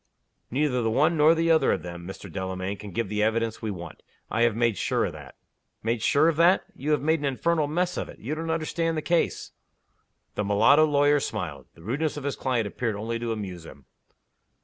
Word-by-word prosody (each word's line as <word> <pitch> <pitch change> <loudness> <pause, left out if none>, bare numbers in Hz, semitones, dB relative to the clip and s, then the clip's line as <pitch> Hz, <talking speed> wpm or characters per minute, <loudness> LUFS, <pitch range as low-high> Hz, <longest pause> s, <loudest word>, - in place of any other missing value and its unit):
"Neither 130 -1 +1
the 115 - +1
one 150 +9 +3
nor 155 +2 +5
the 165 0 +2
other 160 - +4
of 90 - -3
them, 85 0 -8
Mr. 95 - -8
Delamayn, 95 +1 -4
can 105 +1 -9
give 105 +4 -2
the 105 +1 -2
evidence 110 +1 0
we 110 - -3
want. 90 -4 -7 0.3
I 115 - 0
have 120 -2 +3
made 115 -2 +2
sure - - 0
of - - -4
that." - - -11 0.5
"Made 115 0 -1
sure 145 +7 +4
of 165 -2 +1
that? 175 +3 +5
You 145 - -5
have 150 -2 +2
made 160 +1 +2
an 145 - -3
infernal 150 +3 +1
mess 180 +4 -1
of - - -3
it! - - -11
You 135 +8 -4
don't 165 +1 -4
understand 165 0 -1
the 155 - -2
case!" 170 -1 0 0.8
The 105 - -2
mulatto 105 +10 +5
lawyer 145 0 +3
smiled. 85 - -5
The 80 - -16
rudeness 145 - -2
of 145 - -5
his 140 -1 -2
client 125 -4 0
appeared 110 +2 -2
only 115 +3 -3
to 115 -1 -3
amuse 95 -6 -5
him. 70 -4 -13
120 Hz, 215 wpm, -26 LUFS, 105-155 Hz, 0.8 s, nor